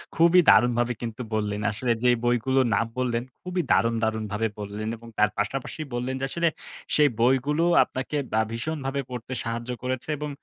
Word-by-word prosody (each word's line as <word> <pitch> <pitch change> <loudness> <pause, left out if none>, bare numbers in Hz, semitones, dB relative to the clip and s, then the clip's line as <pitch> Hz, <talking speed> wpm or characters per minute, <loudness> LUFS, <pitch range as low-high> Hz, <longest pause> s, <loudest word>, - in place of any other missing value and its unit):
খুবই 170 +2 +6
দারুণভাবে 120 0 +4
কিন্তু 115 +1 -5
বললেন। 105 -1 -1
আসলে 120 +3 -1
যে 125 - +5 0.2
বইগুলো 120 +2 +2
নাম 115 - +2
বললেন 120 -2 0 0.2
খুবই 180 0 -1
দারুণ, 115 0 +3
দারুণভাবে 110 0 -1
বললেন 105 +1 -5
এবং 115 +1 -14
তার 105 0 +4
পাশাপাশি 130 +8 -3
বললেন 125 +2 -2
যে, - - +1
আসলে 170 +2 +1 0.5
সেই 150 -1 +5
বইগুলো 135 +6 +2 0.2
আপনাকে 130 +3 -5 0.2
আ - - +5
ভীষণভাবে 140 +2 -3
পড়তে 125 0 -6
সাহায্য 115 +1 -4
করেছে 130 +2 -3
এবং 150 0 -3
120 Hz, 160 wpm, -25 LUFS, 115-135 Hz, 0.5 s, খুবই